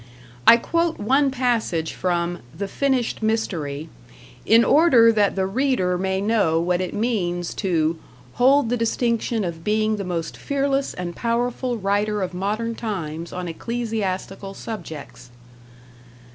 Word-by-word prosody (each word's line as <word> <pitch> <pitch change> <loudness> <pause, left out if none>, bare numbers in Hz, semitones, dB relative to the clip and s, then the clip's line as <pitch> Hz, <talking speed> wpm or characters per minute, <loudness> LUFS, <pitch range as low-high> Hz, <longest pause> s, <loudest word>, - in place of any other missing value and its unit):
I 230 - +10
quote 335 +6 0
one 270 +7 +2
passage 235 -11 0
from 175 -1 -1 0.2
"The 200 - -3
Finished 260 +1 0
Mystery", 165 -10 -2 0.6
in 230 +1 +6
order 260 -8 +6
that 210 -3 +2
the 190 -1 +1
reader 195 -4 +1
may 190 +1 -1
know 200 -6 +2
what 175 +1 0
it 185 - -4
means 180 -6 -1
to 165 -4 +1 0.3
"hold 260 0 +4
the 245 - +1
distinction 230 -1 0
of 165 -2 -5
being 215 +1 +1
the 200 - -3
most 170 -3 -4
fearless 275 -1 -1
and 175 -1 -5
powerful 240 +1 -1
writer 205 0 0
of 180 - -4
modern 210 +5 -2
times 170 -8 -5
on 180 0 -5
ecclesiastical 195 -1 -4
subjects." 150 - -8
210 Hz, 130 wpm, -23 LUFS, 180-235 Hz, 0.6 s, I